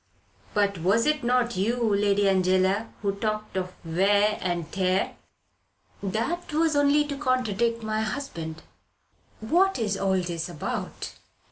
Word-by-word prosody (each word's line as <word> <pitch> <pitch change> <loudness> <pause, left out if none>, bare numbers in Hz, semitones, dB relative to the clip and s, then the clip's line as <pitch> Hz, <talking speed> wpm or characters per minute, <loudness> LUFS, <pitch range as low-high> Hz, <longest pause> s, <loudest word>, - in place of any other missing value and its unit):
"But 200 -3 +1
was 200 +7 +2
it 300 -3 +1
not 240 -1 +2
you, 225 +3 +1
Lady 200 0 +3
Angela, 190 +3 +2
who 200 - +2
talked 215 0 -3
of 185 -1 -2
wear 200 +5 +2
and 175 -3 -2
tear. 185 -1 0 0.9
"That 230 - -2
was 315 0 +2
only 285 +1 +4
to 285 -1 -4
contradict 235 -4 0
my 215 0 -1
husband." 170 - -5 0.8
"What 360 - +3
is 210 -4 -1
all 190 -1 +1
this 170 -1 -4
about?" 165 -4 -5
205 Hz, 130 wpm, -26 LUFS, 190-245 Hz, 0.9 s, only